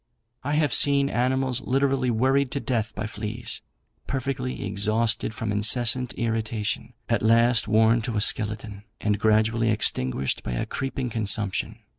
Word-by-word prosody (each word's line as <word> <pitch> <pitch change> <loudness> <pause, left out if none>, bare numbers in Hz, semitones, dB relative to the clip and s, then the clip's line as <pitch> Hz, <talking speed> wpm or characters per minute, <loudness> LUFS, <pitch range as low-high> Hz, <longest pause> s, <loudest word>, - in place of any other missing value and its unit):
I 145 +3 -2
have 150 -3 +1
seen 140 -1 +3
animals 130 +1 0
literally 135 -1 +1
worried 130 +4 +2
to 140 - -1
death 115 -5 -2
by 105 - -3
fleas, 110 +1 -5 0.5
perfectly 130 -3 -3
exhausted 110 +3 -1
from 110 -1 -3
incessant 115 +4 +2
irritation, 110 0 -2
at 115 - +1
last 115 +1 +3
worn 110 +2 +4
to 115 -1 -3
a - - +1
skeleton, 105 -1 0 0.2
and 105 -1 0
gradually 110 +2 +2
extinguished 65 - 0
by 60 - -5
a - - -2
creeping 135 -2 -4
consumption. 105 -2 -2
115 Hz, 140 wpm, -25 LUFS, 105-130 Hz, 0.5 s, worn